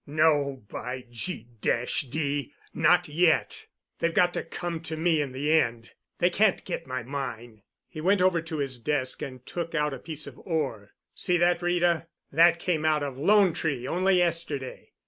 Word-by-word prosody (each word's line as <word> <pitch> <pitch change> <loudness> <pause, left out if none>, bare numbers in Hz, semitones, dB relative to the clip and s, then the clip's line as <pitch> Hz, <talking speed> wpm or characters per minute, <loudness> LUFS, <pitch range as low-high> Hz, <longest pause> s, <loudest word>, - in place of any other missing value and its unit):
"No, 145 -4 +2
by 125 +4 -6
G—d! 125 - -2 0.2
not - - +4
yet. 160 +2 +1 0.3
They've 170 - +1
got 175 0 +4
to - - -1
come 175 -2 -5
to 160 -1 -4
me 160 -1 +2
in 140 -3 -3
the 140 +4 -1
end. 115 -7 +1 0.2
They 175 - +3
can't 205 +1 +2
get 170 -2 -4
my 130 -2 -3
mine." 120 -4 -6 0.3
He 155 - -8
went 195 +4 +3
over 180 -2 +3
to 165 -1 -5
his 135 -4 -2
desk 130 +1 -1
and 130 -2 -7
took 165 -1 -4
out 150 -2 +1
a 135 - -6
piece 155 0 -5
of - - -11
ore. 135 - -3 0.2
"See 180 -1 0
that, 175 0 +3
Rita; 175 -1 +1 0.2
that 170 +3 +6
came 170 -2 -1
out 155 -2 +2
of 140 -2 -4
'Lone 195 +2 +5
Tree' 140 -7 -2
only 185 +2 +2
yesterday. 165 -6 -2
155 Hz, 170 wpm, -27 LUFS, 135-175 Hz, 0.3 s, that